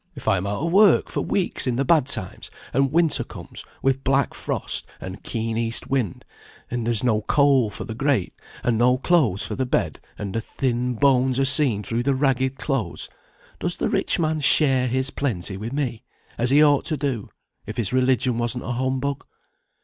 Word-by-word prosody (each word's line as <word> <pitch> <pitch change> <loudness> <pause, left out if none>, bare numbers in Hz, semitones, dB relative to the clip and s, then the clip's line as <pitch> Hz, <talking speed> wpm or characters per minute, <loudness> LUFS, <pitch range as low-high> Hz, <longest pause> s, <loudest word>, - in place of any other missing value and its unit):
If 135 - -10
I 100 - +4
am 95 +2 -3
out 100 +7 -3
of 170 - -1
work 200 +2 +5
for - - -1
weeks 185 -7 -1
in 125 - 0
the 135 +3 0
bad 150 -2 +3
times, 95 -9 -3 0.2
and 135 +1 +2
winter 165 0 +3
comes, - - -10 0.2
with 135 0 +1
black 135 +1 +1
frost, - - -3
and 95 +2 -8
keen 115 0 -3
east 115 +2 -1
wind, 125 -10 -1 0.5
and 120 -2 -2
there - - +2
is 115 -1 +1
no 110 -4 +2
coal 135 -1 +3
for 105 - -6
the 110 - -6
grate, 130 -5 0 0.3
and 115 -2 +1
no 125 +1 +4
clothes 130 - +2
for - - -5
the 130 -1 -2
bed, - - -1 0.2
and 100 -2 -5
the 115 - -1
thin 125 0 -2
bones 130 0 +3
are 135 - +3
seen 135 -7 +4
through 115 +3 -2
the 135 +2 +1
ragged 130 -1 +1
clothes, 125 - -3 0.5
does - - -2
the - - -1
rich - - +1
man 160 -2 0
share 135 -3 +3
his 130 +2 0
plenty 100 -9 -2
with 110 +5 -6
me, 130 -4 -3 0.3
as 120 +1 0
he 145 +3 +6
ought 145 -2 +3
to 155 - -1
do, 135 -6 -3 0.4
if - - -6
his 115 -1 -1
religion 130 -1 +2
wasn't 120 +1 -2
a - - -4
humbug? 130 +3 -2
130 Hz, 200 wpm, -23 LUFS, 115-140 Hz, 0.5 s, he